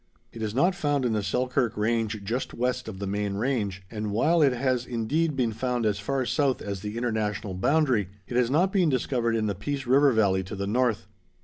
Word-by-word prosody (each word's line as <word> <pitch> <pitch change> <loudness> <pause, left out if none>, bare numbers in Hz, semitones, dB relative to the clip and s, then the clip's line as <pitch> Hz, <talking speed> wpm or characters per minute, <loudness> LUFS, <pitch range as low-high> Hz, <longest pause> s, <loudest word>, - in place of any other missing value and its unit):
It 115 - -8
is 110 0 -3
not 175 +8 +3
found 145 -6 0
in 120 - +1
the 105 - 0
Selkirk 125 +3 0
Range 110 -1 0
just 115 +6 -3
west 125 0 -1
of 110 -4 -6
the 100 - -4
main 100 0 -2
range, 105 -5 -1
and 105 -1 -3
while 155 +11 +2
it 140 -3 +5
has 125 -1 0
indeed 135 +7 -1
been 125 -4 +1
found 125 +1 -1
as 105 -1 +1
far 130 +5 -1
south 140 0 +1
as 100 -2 -5
the 105 +2 -5
International 110 -4 -2
boundary, 125 - +2 0.2
it 120 - -6
has 125 -1 +3
not 175 +8 +2
been 185 -5 +3
discovered 120 -3 0
in 110 -1 0
the 105 - 0
Peace 135 +8 -4
River 135 +3 +5
valley 100 -5 +2
to 100 - -6
the 100 0 -3
north. 115 -1 +1
115 Hz, 215 wpm, -26 LUFS, 105-130 Hz, 0.2 s, it